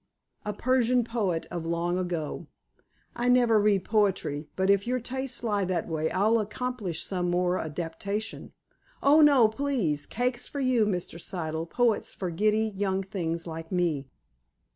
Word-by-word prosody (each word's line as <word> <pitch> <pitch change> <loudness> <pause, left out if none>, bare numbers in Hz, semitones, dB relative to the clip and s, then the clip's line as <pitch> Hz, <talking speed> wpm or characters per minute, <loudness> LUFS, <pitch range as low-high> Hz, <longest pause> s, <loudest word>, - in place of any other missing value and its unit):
"A 210 - -1
Persian 250 +2 +2
poet 210 -8 -1
of 175 -2 -3
long 170 +2 -1
ago." 175 -4 -3 0.7
"I 240 +1 0
never 240 -3 +5
read 205 -2 +2
poetry. 195 -9 0
But, 190 +1 +3
if 200 +2 +2
your 255 +1 +1
tastes 260 +1 -3
lie 205 -3 +1
that 180 -2 -1
way, 160 -1 -1
I'll 215 +4 +3
accomplish 215 -5 -3
some 180 -2 -1
more 180 +1 +1
adaptation." 175 +7 -4 0.5
"Oh, 295 +3 +6
no, 280 -6 +7
please. 220 - -1
Cakes 245 +1 -2
for 285 - -6
you, 255 -5 +3
Mr. 175 -3 -3
Siddle; 160 -3 -4
poets 240 -1 +1
for 185 -3 -3
giddy 215 +4 +1
young 195 -1 0
things 170 -4 -3
like 165 -1 -7
me." 165 -7 0
200 Hz, 150 wpm, -28 LUFS, 170-235 Hz, 0.7 s, no